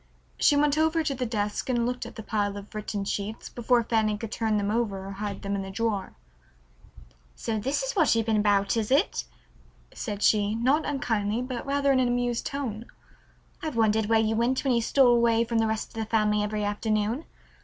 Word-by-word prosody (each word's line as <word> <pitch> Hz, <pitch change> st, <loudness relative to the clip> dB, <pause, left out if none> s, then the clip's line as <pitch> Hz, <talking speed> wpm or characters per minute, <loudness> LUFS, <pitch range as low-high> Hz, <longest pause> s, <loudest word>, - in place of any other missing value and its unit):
She 290 Hz, -, +5 dB
went 295 Hz, +1 st, +3 dB
over 320 Hz, +1 st, +2 dB
to 295 Hz, -3 st, -1 dB
the 250 Hz, -2 st, -3 dB
desk 210 Hz, +1 st, -2 dB
and 240 Hz, -2 st, +1 dB
looked 250 Hz, 0 st, -3 dB
at -, -, -12 dB
the 220 Hz, -, -7 dB
pile 205 Hz, -2 st, -1 dB
of 200 Hz, +2 st, -10 dB
written 210 Hz, -1 st, -4 dB
sheets 205 Hz, +3 st, -4 dB
before 240 Hz, 0 st, +1 dB
Fanny 220 Hz, -2 st, +1 dB
could 220 Hz, 0 st, -6 dB
turn 220 Hz, -2 st, 0 dB
them 205 Hz, 0 st, 0 dB
over 210 Hz, -4 st, -1 dB
or 195 Hz, -, -6 dB
hide 200 Hz, 0 st, -5 dB
them 200 Hz, 0 st, -2 dB
in 200 Hz, -, -1 dB
the 195 Hz, -, -6 dB
drawer. 205 Hz, -1 st, -2 dB, 1.2 s
"So 220 Hz, -1 st, -2 dB
this 270 Hz, -, -1 dB
is -, -, -2 dB
what 320 Hz, -, +4 dB
you've 225 Hz, -1 st, +1 dB
been 220 Hz, -1 st, +2 dB
about, 205 Hz, -1 st, +2 dB
is 220 Hz, -2 st, -1 dB
it?" 260 Hz, -, +2 dB, 0.7 s
said 205 Hz, 0 st, -4 dB
she, 210 Hz, 0 st, +3 dB
not 265 Hz, +7 st, +2 dB
unkindly, 225 Hz, -5 st, -1 dB
but 255 Hz, +1 st, -5 dB
rather 280 Hz, 0 st, +2 dB
in 265 Hz, -, +3 dB
an 255 Hz, -, +3 dB
amused 245 Hz, -1 st, -1 dB
tone. 240 Hz, -5 st, -4 dB, 0.7 s
"I've 315 Hz, -5 st, -4 dB
wondered 220 Hz, -1 st, +2 dB
where 225 Hz, 0 st, +4 dB
you 220 Hz, 0 st, +1 dB
went 240 Hz, +3 st, +1 dB
when 270 Hz, -3 st, +2 dB
you 235 Hz, -, +2 dB
stole 250 Hz, +1 st, +4 dB
away 235 Hz, -1 st, +3 dB
from 230 Hz, -1 st, -1 dB
the 225 Hz, -, +2 dB
rest 220 Hz, 0 st, -2 dB
of -, -, -20 dB
the 215 Hz, -, -10 dB
family 210 Hz, -1 st, +2 dB
every 210 Hz, 0 st, -2 dB
afternoon. 215 Hz, +5 st, -1 dB
225 Hz, 210 wpm, -27 LUFS, 210-250 Hz, 1.2 s, She